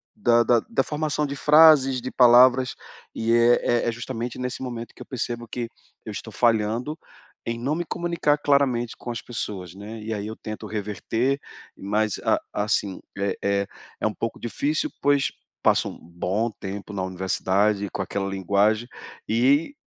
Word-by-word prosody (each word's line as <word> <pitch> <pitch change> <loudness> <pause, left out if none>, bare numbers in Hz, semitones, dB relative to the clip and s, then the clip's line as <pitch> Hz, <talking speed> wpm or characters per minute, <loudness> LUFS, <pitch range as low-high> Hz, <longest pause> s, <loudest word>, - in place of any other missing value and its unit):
da 120 - +4
da 115 0 +3
da 230 - +1
formação 150 0 -1
de 140 0 -4
frases, 150 -3 +6
de 130 - -5
palavras, 125 +1 +6 0.4
e 115 +1 +1
é 120 +1 +5 0.2
é - - +1
é - - 0
justamente 120 +1 -5
nesse 125 0 -4
momento 120 -2 -6
que - - -15
eu 125 - -7
percebo 120 -2 -4
que 120 +1 -4 0.4
eu - - -5
estou - - -7
falhando 115 +5 +1 0.5
em 115 0 -3
não 135 +6 -1
me 175 - -1
comunicar 170 -4 0
claramente 135 -5 +1
com 120 - -6
as 115 - -5
pessoas, 95 -7 -5
né, 105 +3 -8
e 110 +1 -4
aí 105 -1 -4
eu 110 - -6
tento 110 0 -7
reverter, 110 +6 -1 0.4
mas 105 +1 -1
a - - +3
assim, 105 -2 -1 0.2
é 100 0 -1
é 100 0 +1 0.3
é - - +2
um - - -2
pouco - - -4
difícil, 145 +6 -1
pois 140 -1 +3 0.4
passo - - +3
um - - -10
bom 90 +7 -2
tempo 100 +1 -6
na 95 - -2
universidade, 95 +2 0
com - - -3
aquela 95 0 -2
linguagem, 100 +4 +1 0.4
e 135 - +3
115 Hz, 170 wpm, -24 LUFS, 105-130 Hz, 0.5 s, frases